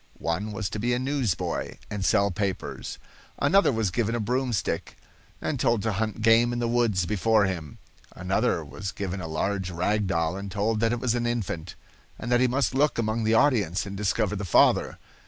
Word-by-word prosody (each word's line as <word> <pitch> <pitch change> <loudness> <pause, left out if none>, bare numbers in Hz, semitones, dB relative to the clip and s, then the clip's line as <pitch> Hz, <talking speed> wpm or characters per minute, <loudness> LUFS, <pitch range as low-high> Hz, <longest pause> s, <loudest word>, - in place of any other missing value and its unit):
One 95 +6 -2
was 105 -1 -3
to 105 - -4
be 120 +3 +1
a - - 0
newsboy, 130 - -2
and 105 -2 -3
sell 100 -1 +3
papers. 95 0 -4 0.4
Another 150 +5 +4
was 110 -6 0
given 115 +2 0
a - - -1
broomstick 125 +1 -1 0.4
and 140 - -2
told 115 -4 +2
to 110 - 0
hunt 110 +2 -2
game 115 +2 +5
in 120 - -2
the 120 -1 0
woods 115 -6 +1
before 105 +3 +2
him. 85 -7 -4 0.4
Another - - 0
was 100 -1 -6
given 95 -2 -4
a 80 - -5
large 95 +4 -2
rag 95 +4 0
doll 85 -2 0
and 100 0 -6
told 105 +3 0
that 115 +1 +2
it 120 - -1
was 120 -1 0
an 120 -1 0
infant, 95 -8 -3 0.4
and 120 - -5
that 120 - +4
he 130 - +4
must 130 +2 0
look 145 +3 +2
among 110 0 0
the 110 +1 +3
audience 100 - +2
and 100 -1 -6
discover 105 +1 0
the 105 - -4
father. 90 - +3
110 Hz, 195 wpm, -26 LUFS, 95-120 Hz, 0.4 s, game